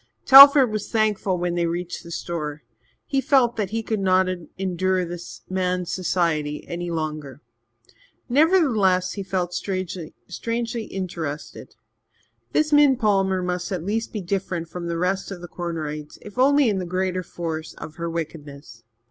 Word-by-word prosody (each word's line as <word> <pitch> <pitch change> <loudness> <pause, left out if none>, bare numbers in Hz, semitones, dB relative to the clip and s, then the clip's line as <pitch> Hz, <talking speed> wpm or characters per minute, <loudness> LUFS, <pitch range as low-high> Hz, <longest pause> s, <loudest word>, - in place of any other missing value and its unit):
Telford 275 -2 +10
was 215 -1 -4
thankful 210 -4 +1
when 175 0 -1
they 170 -1 0
reached 175 +1 -4
the 170 - -12
store. 155 -4 -5 0.4
He 275 -1 0
felt 260 -4 +3
that 210 -4 -2
he 225 +2 -3
could 220 -1 -2
not 185 -1 +3 0.3
endure 185 0 0
this 175 0 -8
man's 180 -1 -1
society 165 -5 -1
any 175 0 -4
longer. 155 -5 -4 0.9
Nevertheless, 240 - +3
he 200 - -5
felt 185 -2 -2
strangely 195 +6 -4
interested. 170 -6 -6 0.8
This 305 -1 +1
Min 290 -3 +6
Palmer 195 -5 +1
must 180 0 -3
at 180 -4 -3
least 220 +3 -2
be 210 - -4
different 180 -2 -3
from 175 0 -6
the 170 0 -2
rest 185 +3 -1
of 195 -3 -7
the 175 - -9
Cornerites, 155 -4 -5
if 210 +3 -9
only 280 +1 +5
in 200 -3 +1
the 180 - -4
greater 185 +1 -1
force 165 -2 -6
of 155 - -10
her 170 0 -3
wickedness. 145 -7 -7
185 Hz, 150 wpm, -23 LUFS, 170-210 Hz, 0.9 s, Telford